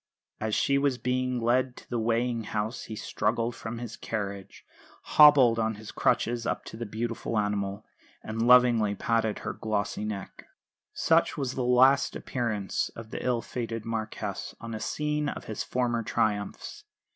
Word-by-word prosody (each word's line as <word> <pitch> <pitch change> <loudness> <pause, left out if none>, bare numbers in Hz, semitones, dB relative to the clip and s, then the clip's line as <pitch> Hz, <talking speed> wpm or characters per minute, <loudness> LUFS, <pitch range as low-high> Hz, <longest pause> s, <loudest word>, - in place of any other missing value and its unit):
As 110 -1 -1
she 140 0 +2
was 140 -3 +1
being 125 0 -1
led 125 +2 +1
to - - -13
the 120 - -2
weighing 115 0 0
house 110 +3 -3
he 110 - -6
struggled 115 +3 -1
from 115 +1 -6
his 115 -2 -6
carriage, 100 -4 -5 0.4
hobbled 140 -6 +7
on 110 -1 0
his 105 0 -9
crutches 120 0 +1
up - - -2
to - - -8
the 115 0 -5
beautiful 115 +1 -3
animal, 105 0 -1 0.4
and 110 +1 -4
lovingly 120 -4 +5
patted 115 0 0
her - - -2
glossy 105 -1 -2
neck. 105 -2 -6 0.4
Such - - +2
was 135 -3 -2
the 130 - -2
last 130 +3 +4
appearance 110 -6 -2
of 115 -1 -9
the - - -5
ill 120 -3 0
fated 115 -2 -4
Marquess 110 -1 -4
on 115 0 -7
a 110 - -4
scene 150 +3 -1
of - - -6
his 110 - -4
former 120 -2 0
triumphs. 105 -2 -2
115 Hz, 160 wpm, -28 LUFS, 110-125 Hz, 0.4 s, hobbled